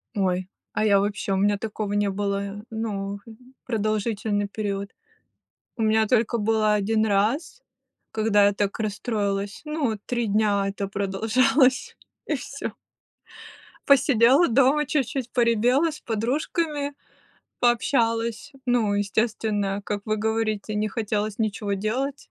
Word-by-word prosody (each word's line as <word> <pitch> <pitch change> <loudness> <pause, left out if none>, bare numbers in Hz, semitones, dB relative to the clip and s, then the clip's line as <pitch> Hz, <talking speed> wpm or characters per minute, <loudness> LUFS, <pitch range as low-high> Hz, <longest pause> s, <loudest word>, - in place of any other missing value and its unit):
Ой, 185 -2 0 0.3
а 215 - +1
я 200 -2 +5
вообще, 205 0 -1
у - - +1
меня 205 +1 +2
такого 210 -1 -4
не 205 -1 +1
было, 200 +1 -3
ну, 205 -3 -4 0.5
продолжительный 215 -2 -1
период. 200 -1 -4 0.9
У 225 - -2
меня 220 0 +3
только 235 0 +2
было 215 0 +2
1 215 +1 +1
раз, 220 - 0 0.5
когда 215 -2 +3
я 205 - +2
так 200 +1 -1
расстроилась. 205 -2 -2
Ну, 285 -8 -1
3 240 -2 -1
дня 205 -1 +2
это 200 0 -4
продолжалось, 250 +8 +2 0.3
и - - 0
всё. - - -6 1.1
Посидела 275 +2 +5
дома 270 +4 +3
чуть-чуть 265 -3 -1
поревела, 245 +6 +3
с 300 - -9
подружками 285 +6 -2 0.7
пообщалась. 235 +1 +1
Ну, 235 -5 +2
естественно, 205 -1 -1
как 205 -1 -3
вы 215 - 0
говорите, 215 -1 -1
не 210 +1 0
хотелось 210 -1 -2
ничего 210 -2 -1
делать. 255 +8 -3
215 Hz, 120 wpm, -24 LUFS, 205-240 Hz, 1.1 s, я